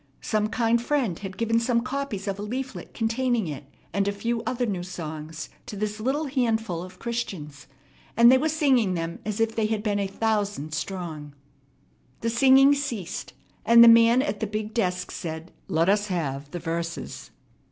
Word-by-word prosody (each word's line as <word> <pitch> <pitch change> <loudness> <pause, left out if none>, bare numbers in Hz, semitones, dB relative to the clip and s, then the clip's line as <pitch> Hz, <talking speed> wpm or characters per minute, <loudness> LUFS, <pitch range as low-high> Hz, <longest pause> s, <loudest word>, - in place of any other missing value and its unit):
Some 215 -1 +1
kind 230 +1 +1
friend 240 - 0
had 190 -2 -7
given 230 0 +2
some 235 0 +1
copies 255 -6 -4
of 195 0 -2
a - - -4
leaflet 255 +5 -5
containing 235 -1 0
it 145 -3 -6 0.3
and 200 0 +1
a - - +2
few 230 +3 -2
other 250 0 0
new 195 -6 -2
songs 160 -3 -6 0.2
to - - -6
this 210 +1 -3
little 270 +7 0
handful 225 - 0
of 185 +1 -10
Christians, 190 -12 -5 0.5
and 235 +1 +8
they 260 - +7
were 315 +3 +1
singing 265 -11 +2
them 165 0 -4
as 215 0 -3
if 225 0 +1
they 220 -2 +1
had 215 -1 -2
been 205 -2 0
a 200 - 0
thousand 205 -6 -1
strong. 155 -4 -5 0.9
The 230 - 0
singing 270 +3 +6
ceased 235 - -4 0.3
and 235 +2 +8
the - - +9
man 230 +2 +7
at 205 -4 -3
the 220 - -1
big 215 +1 -4
desk 185 -5 -1
said, 160 0 -6 0.2
"Let 165 -2 +1
us 205 +1 +2
have 145 -6 -3
the 175 - -5
verses." 170 0 -4
215 Hz, 180 wpm, -25 LUFS, 180-235 Hz, 0.9 s, the